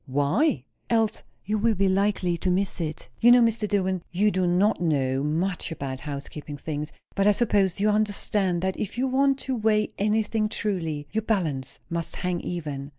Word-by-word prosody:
"Why?" 145 - +1 0.3
"Else 225 -2 +1 0.2
you 210 +2 0
will 225 +1 +2
be 195 +1 +2
likely 190 -2 +1
to 175 +2 -2
miss 185 0 0
it. 155 -2 -4
You 240 +1 +7
know, 245 0 +7
Mr. 230 -1 +1
Dillwyn, 190 -3 0
you 205 +4 +2
do 185 -2 +1
not 185 +3 +2
know 135 -5 +1
much 165 +4 -1
about 135 -4 -4
housekeeping 145 +1 -7
things, 150 0 -4 0.2
but 195 0 +2
I - - +7
suppose 200 -4 +2
you 205 - +2
understand, 205 -3 0
that 190 0 -1
if 210 - -4
you 260 +2 +1
want 270 +1 +3
to 265 - -2
weigh 215 -2 +2
anything 215 +1 +1
truly, 165 -10 -2
your 220 - 0
balance 165 - -1
must 170 -1 -4
hang 180 -1 -2
even." 145 -5 -5
190 Hz, 180 wpm, -26 LUFS, 155-215 Hz, 0.3 s, You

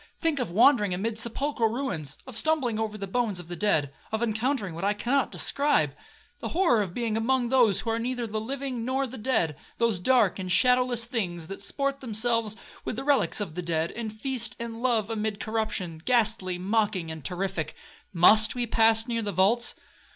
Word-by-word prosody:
Think 325 -4 0
of 245 - -1
wandering 210 -1 +4
amid 220 +4 -2
sepulchral 235 +1 0
ruins, 180 - -4
of 260 -3 -10
stumbling 245 -3 +1
over 215 -1 -3
the 200 - -5
bones 210 -1 -1
of 175 -1 -10
the 175 - -5
dead, 155 -7 +1 0.2
of 220 +1 -1
encountering 220 - -1
what 170 +3 -6
I 205 +1 +1
cannot 255 +6 0
describe,—the 155 - 0
horror 335 - +2
of 185 -4 -4
being 230 -3 -1
among 240 +2 +1
those 230 -7 +4
who 225 - -2
are 225 - -1
neither 245 0 -2
the 215 -1 -3
living 255 0 -4
or 270 +1 0
the 260 -1 -8
dead;—those 215 - -1
dark 215 -1 +3
and 185 -1 -4
shadowless 250 +4 +3
things 180 -9 -3
that 195 +4 -8
sport 275 +6 -1
themselves 230 -2 0 0.3
with - - -4
the 265 - -4
reliques 285 -5 +2
of 195 -7 -4
the 180 - -4
dead, 165 -1 -1
and 225 -2 -5
feast 235 +2 -2
and 230 0 -6
love 230 -4 +1
amid 215 -1 -2
corruption,—ghastly, 215 -1 0
mocking, 195 -3 0
and 160 -2 -8
terrific. 175 -1 -3 0.4
Must 215 +7 +5
we 245 -1 -1
pass 225 0 +3
near 230 -1 -1
the 205 -2 -3
vaults?' 200 +6 +2
225 Hz, 180 wpm, -27 LUFS, 195-245 Hz, 0.4 s, Must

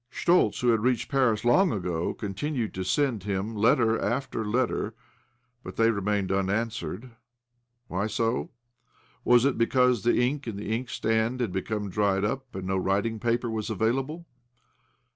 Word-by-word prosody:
Schtoltz, 175 +8 +2
who 125 - +3
had 115 -1 +4
reached 125 +1 0
Paris 125 -6 +2
long 175 +9 +4
ago, 90 -4 -2
continued 110 +4 -3
to 95 - -3
send 125 +2 0
him 100 +3 -3
letter 115 +1 +3
after 130 -2 -2
letter, 115 0 -1 0.7
but - - -8
they 115 0 +4
remained 100 -2 -1
unanswered. 110 +4 -2 0.8
Why 95 +4 -1
so? 115 +2 -1 0.7
Was 120 +1 +5
it 140 -4 +1
because 125 -1 +3
the 120 - +2
ink 135 +2 0
in 110 - -4
the 105 +2 -3
inkstand 115 0 -1
had 120 -6 -1
become 100 +2 -3
dried 100 0 +1
up 130 +2 -4
and 95 -1 -5
no 95 0 0
writing 100 +4 0
paper 120 0 0
was 110 -1 -3
available 130 - -1
115 Hz, 150 wpm, -27 LUFS, 100-125 Hz, 0.8 s, Was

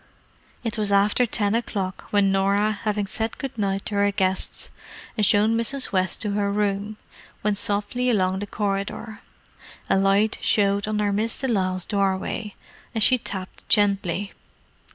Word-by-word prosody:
It 230 -1 -3
was 205 -1 +1
after 205 +5 +3
ten 205 -1 0
o'clock 200 -5 -2
when 200 -2 +3
Norah, 200 +2 +2
having 210 -1 0
said 220 +3 -3
good 270 -3 -5
night 195 -3 -1
to - - -3
her 200 0 +2
guests 190 -2 -1 0.4
and 215 - 0
shown 210 +2 +4
Mrs. 255 +4 -1
West 185 +1 0
to 210 - -1
her 200 0 0
room, 205 +1 -1 0.5
went 210 -1 +1
softly 210 +5 0
along 190 -4 +1
the 205 - -5
corridor. 205 +2 -3 0.7
A - - +4
light 200 +3 +3
showed 200 -1 +2
under 210 -1 0
Miss 220 +3 -1
de 270 - -1
Lisle's 185 -5 0
doorway, 200 +1 -1 0.4
and 220 - +3
she 255 +3 +6
tapped 190 -3 -7
gently. 200 -2 +2
205 Hz, 155 wpm, -24 LUFS, 195-215 Hz, 0.7 s, she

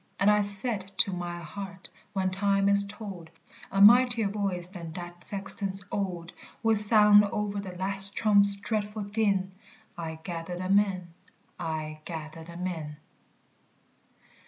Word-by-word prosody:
And 200 +2 +4
I 210 0 +3
said 200 -1 -4
to 195 - +2
my 175 -1 -5
heart, 190 +3 -7 0.3
when 190 -2 -1
time 195 +1 +1
is 200 0 +3
told, 200 -6 -9 0.4
A 195 - -1
mightier 235 +1 +6
voice 195 -4 -3
than 170 -4 -9
that 175 0 -9
sexton's 195 -1 -3
old 180 -4 -4 0.3
Will 225 0 +3
sound 210 -1 +7
o'er 205 0 -3
the 185 -3 -8
last 195 +1 +2
trump's 200 -2 +6
dreadful 210 +1 -4
din 200 -2 -1 0.4
"I 160 -2 -6
gather 175 0 -6
them 185 +2 +2
in, 185 -4 -4 0.5
I 155 -2 -5
gather 160 -1 -8
them 170 +2 -8
in." 160 -5 -5
195 Hz, 135 wpm, -27 LUFS, 175-205 Hz, 0.5 s, sound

